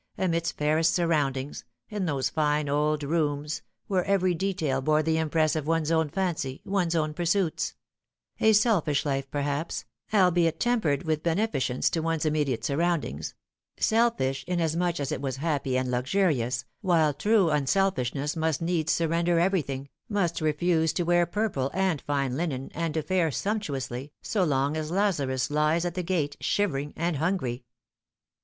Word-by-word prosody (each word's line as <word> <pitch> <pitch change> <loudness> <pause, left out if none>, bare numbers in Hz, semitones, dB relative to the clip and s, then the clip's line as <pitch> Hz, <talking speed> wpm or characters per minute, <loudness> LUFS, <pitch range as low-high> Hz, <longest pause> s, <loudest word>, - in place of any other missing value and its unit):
amidst 170 -3 -1
fairest 155 +2 +2
surroundings, 145 -5 0 0.2
in 210 -3 -3
those 140 -4 0
fine 150 -1 +1
old 150 +1 +1
rooms 150 -1 -1 0.2
where 185 -3 +1
every 185 -2 +2
detail 165 -7 -1
bore 155 +3 +2
the 160 +1 +1
impress 155 -1 +1
of 155 -2 -2
one's 165 -1 +1
own 160 -2 +2
fancy, 155 -7 -2
one's 180 -4 0
own 155 -2 0
pursuits: 175 +1 0 0.6
a 220 - +5
selfish 205 - +2
life, 135 -1 -1
perhaps, 145 +2 -2 0.3
albeit 175 -5 +3
tempered 215 - +1
with 155 -2 -1
beneficence 165 - 0
to 165 - +1
one's 165 -1 -1
immediate 145 -7 0
surroundings; 145 - -1 0.4
selfish 220 - +1
inasmuch 175 -1 0
as 140 -2 -2
it - - -3
was 135 -2 -2
happy 140 -4 0
and 130 -1 -1
luxurious, 125 -3 0 0.2
while 165 -6 +3
true 205 0 +3
unselfishness 150 -2 0
must 160 -2 0
needs 165 -2 0
surrender 170 +1 +1
everything, 150 -7 0 0.2
must 175 -6 0
refuse 160 +1 +2
to 175 - -1
wear 175 0 +3
purple 175 -9 -1
and 190 -6 +1
fine 140 -3 -1
linen 135 -4 -3
and 165 -1 -2
to 160 - 0
fare 180 -2 +1
sumptuously, 140 - -3
so 205 -4 0
long 140 -2 +1
as 155 -1 -3
Lazarus 150 -9 0
lies 155 +3 +2
at 175 - -2
the 180 - -2
gate 165 -5 -1
shivering 150 -8 0
and 170 -1 -1
hungry. 135 -7 -1
160 Hz, 150 wpm, -27 LUFS, 145-175 Hz, 0.6 s, a